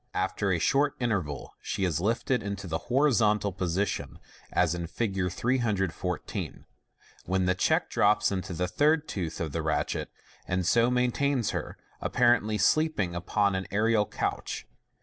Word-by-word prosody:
After -, -, 0 dB
a -, -, +2 dB
short 145 Hz, +1 st, +2 dB
interval 95 Hz, -, -2 dB
she 100 Hz, -2 st, -2 dB
is 85 Hz, -4 st, 0 dB
lifted 115 Hz, +4 st, +1 dB
into 100 Hz, -1 st, -5 dB
the 80 Hz, -2 st, -2 dB
horizontal 115 Hz, -7 st, +3 dB
position, 95 Hz, +2 st, -2 dB, 0.3 s
as 90 Hz, -2 st, +2 dB
in 85 Hz, -1 st, -4 dB
Fig. 95 Hz, -2 st, -1 dB
314, 95 Hz, -6 st, -2 dB, 0.6 s
when 95 Hz, 0 st, +1 dB
the 90 Hz, -, +3 dB
check 90 Hz, -, +1 dB
drops 105 Hz, +1 st, +3 dB
into 95 Hz, -1 st, -3 dB
the 90 Hz, -, 0 dB
tl 90 Hz, -, -9 dB
ir 155 Hz, +2 st, +6 dB
tooth 95 Hz, -, -5 dB
of 80 Hz, -3 st, -2 dB
the -, -, -2 dB
ratchet, -, -, -1 dB, 0.4 s
and 90 Hz, 0 st, 0 dB
so 115 Hz, +6 st, +4 dB
maintains 125 Hz, 0 st, +1 dB
her, -, -, -4 dB, 0.2 s
apparently 120 Hz, -3 st, +2 dB
sleeping 155 Hz, -, +2 dB
upon 100 Hz, +3 st, +1 dB
an 95 Hz, +1 st, -2 dB
aerial 105 Hz, +1 st, +2 dB
couch. -, -, -3 dB
100 Hz, 150 wpm, -28 LUFS, 90-120 Hz, 0.6 s, ir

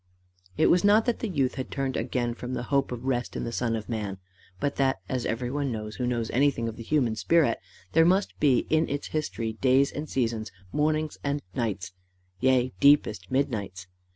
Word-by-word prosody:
It -, -, +4 dB
was 175 Hz, 0 st, +4 dB
not 210 Hz, +2 st, +5 dB
that 240 Hz, -2 st, 0 dB
the 230 Hz, -, -2 dB
youth 135 Hz, -7 st, +1 dB
had -, -, -8 dB
turned 135 Hz, -2 st, -2 dB
again 120 Hz, 0 st, -1 dB
from 125 Hz, +1 st, -5 dB
the -, -, -3 dB
hope 140 Hz, -1 st, +2 dB
of 125 Hz, 0 st, -5 dB
rest 125 Hz, -2 st, -1 dB
in -, -, -3 dB
the 115 Hz, -, -3 dB
Son 115 Hz, -1 st, 0 dB
of 110 Hz, -1 st, -5 dB
Man; 105 Hz, -4 st, -3 dB, 0.4 s
but 140 Hz, +7 st, -1 dB
that, 135 Hz, -4 st, +2 dB
as 125 Hz, +1 st, -2 dB
everyone 130 Hz, +4 st, -2 dB
knows 110 Hz, -1 st, -5 dB
who 125 Hz, -, -1 dB
knows 120 Hz, -2 st, -1 dB
anything 130 Hz, -3 st, +2 dB
of 115 Hz, -, -4 dB
the -, -, -9 dB
human 120 Hz, -2 st, +1 dB
spirit, 120 Hz, -, +2 dB, 0.3 s
there 165 Hz, -, +5 dB
must 190 Hz, +4 st, +2 dB
be 135 Hz, -5 st, +3 dB
in 160 Hz, +1 st, +3 dB
its 145 Hz, 0 st, -3 dB
history 115 Hz, -7 st, -2 dB
days 130 Hz, +4 st, +3 dB
and 150 Hz, 0 st, -5 dB
seasons, 115 Hz, -4 st, -1 dB, 0.2 s
mornings 155 Hz, +1 st, 0 dB
and 145 Hz, +1 st, -1 dB
nights, 105 Hz, -7 st, -2 dB, 0.5 s
yea 130 Hz, -1 st, +2 dB
deepest 110 Hz, -10 st, +4 dB
midnights. 105 Hz, -9 st, -2 dB
130 Hz, 195 wpm, -27 LUFS, 115-145 Hz, 0.5 s, not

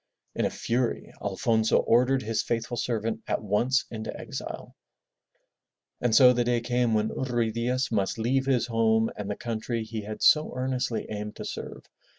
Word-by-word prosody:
In -, -, 0 dB
a -, -, +2 dB
fury 120 Hz, 0 st, -2 dB
Alfonso 110 Hz, +2 st, +2 dB
ordered 125 Hz, +3 st, +3 dB
his 110 Hz, 0 st, 0 dB
faithful 115 Hz, +1 st, -2 dB
servant 115 Hz, -2 st, -2 dB
at -, -, 0 dB
once 120 Hz, +7 st, +1 dB
into 110 Hz, -1 st, -5 dB
exile. -, -, -7 dB, 1.3 s
And 120 Hz, -2 st, +2 dB
so 125 Hz, -2 st, +8 dB
the 120 Hz, 0 st, +1 dB
day 120 Hz, 0 st, +1 dB
came 120 Hz, -1 st, +1 dB
when 110 Hz, 0 st, +1 dB
Ruy 120 Hz, -3 st, -1 dB
Diaz 125 Hz, +3 st, -1 dB
must 100 Hz, -2 st, 0 dB
leave 130 Hz, +4 st, 0 dB
his 125 Hz, -4 st, +2 dB
home 115 Hz, -1 st, +2 dB
and 105 Hz, -1 st, -5 dB
the 105 Hz, -, -2 dB
country 115 Hz, 0 st, -3 dB
he 110 Hz, 0 st, -5 dB
had 105 Hz, +1 st, -6 dB
so 155 Hz, 0 st, +5 dB
earnestly 130 Hz, -2 st, -1 dB
aimed 105 Hz, 0 st, -5 dB
to -, -, -7 dB
serve. -, -, -7 dB
115 Hz, 165 wpm, -27 LUFS, 110-125 Hz, 1.3 s, so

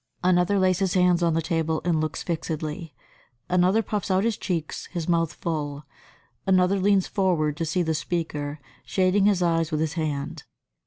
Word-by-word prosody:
Another 180 Hz, +2 st, +3 dB
lays 185 Hz, -2 st, +2 dB
his 190 Hz, -2 st, 0 dB
hands 180 Hz, -1 st, +4 dB
on 170 Hz, -2 st, +2 dB
the 165 Hz, -, 0 dB
table 160 Hz, -1 st, 0 dB
and 165 Hz, -3 st, +2 dB
looks 155 Hz, -1 st, -3 dB
fixedly. 160 Hz, -1 st, -4 dB, 0.5 s
Another 180 Hz, +5 st, +3 dB
puffs 210 Hz, -3 st, -3 dB
out 190 Hz, +1 st, +2 dB
his 230 Hz, -1 st, +1 dB
cheeks, 170 Hz, -6 st, -4 dB
his 170 Hz, -3 st, -5 dB
mouth 165 Hz, -2 st, +1 dB
full. 150 Hz, -3 st, -4 dB, 0.6 s
Another 190 Hz, +1 st, +3 dB
leans 195 Hz, -1 st, +3 dB
forward 170 Hz, -7 st, 0 dB
to 165 Hz, -, -1 dB
see 175 Hz, +3 st, 0 dB
the 160 Hz, -1 st, 0 dB
speaker, 150 Hz, -3 st, -3 dB, 0.2 s
shading 190 Hz, +1 st, +2 dB
his 200 Hz, -3 st, +3 dB
eyes 165 Hz, -2 st, +1 dB
with 155 Hz, -, 0 dB
his 155 Hz, -1 st, -1 dB
hand. 150 Hz, -4 st, -3 dB
170 Hz, 170 wpm, -25 LUFS, 155-185 Hz, 0.6 s, hands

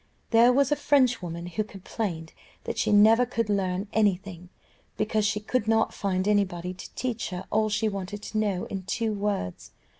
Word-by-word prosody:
There 235 Hz, +1 st, +6 dB
was 275 Hz, +2 st, +2 dB
a -, -, +4 dB
Frenchwoman 245 Hz, -, +1 dB
who 180 Hz, +5 st, -2 dB
complained 190 Hz, -4 st, -5 dB, 0.3 s
that -, -, -4 dB
she -, -, +1 dB
never 220 Hz, +3 st, +6 dB
could 230 Hz, -3 st, -2 dB
learn 190 Hz, 0 st, -1 dB
any 210 Hz, -3 st, +4 dB
thing, 180 Hz, -2 st, -11 dB, 0.5 s
because 215 Hz, -1 st, +1 dB
she 205 Hz, +1 st, 0 dB
could 215 Hz, +1 st, -1 dB
not 225 Hz, 0 st, +2 dB
find 190 Hz, -1 st, -1 dB
anybody 185 Hz, -4 st, 0 dB
to 185 Hz, -, -10 dB
teach 240 Hz, -3 st, -3 dB
her 180 Hz, 0 st, -6 dB
all 215 Hz, 0 st, +2 dB
she 210 Hz, +1 st, 0 dB
wanted 200 Hz, 0 st, -5 dB
to 215 Hz, -, -3 dB
know 200 Hz, -4 st, 0 dB
in 195 Hz, -, -5 dB
two 215 Hz, +3 st, -2 dB
words. 200 Hz, -, -3 dB
205 Hz, 180 wpm, -27 LUFS, 185-220 Hz, 0.5 s, There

